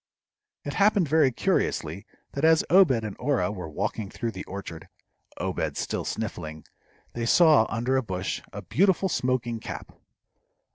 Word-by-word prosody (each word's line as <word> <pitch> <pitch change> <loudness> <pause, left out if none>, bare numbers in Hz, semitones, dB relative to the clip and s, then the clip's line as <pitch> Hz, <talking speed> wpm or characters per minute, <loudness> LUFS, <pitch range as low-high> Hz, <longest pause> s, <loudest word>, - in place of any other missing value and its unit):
It 145 - -4
happened 200 -4 +3
very 150 -2 +4
curiously 85 -6 -1 0.2
that 140 - -5
as 160 0 +5
Obed 185 -2 +7
and 105 -2 -5
Orah 125 -9 +1
were 90 -6 -6
walking 100 +5 -3
through 115 +2 -4
the 95 - -7
orchard, 95 -4 -8 0.5
Obed - - -2
still - - -2
sniffling, 80 0 -5 0.5
they 115 -1 -3
saw, 155 -7 +6
under 120 +4 0
a - - +2
bush, 95 -5 -3
a - - -7
beautiful 190 +2 +2
smoking 125 -5 -1
cap. - - -7
120 Hz, 145 wpm, -26 LUFS, 100-155 Hz, 0.5 s, Obed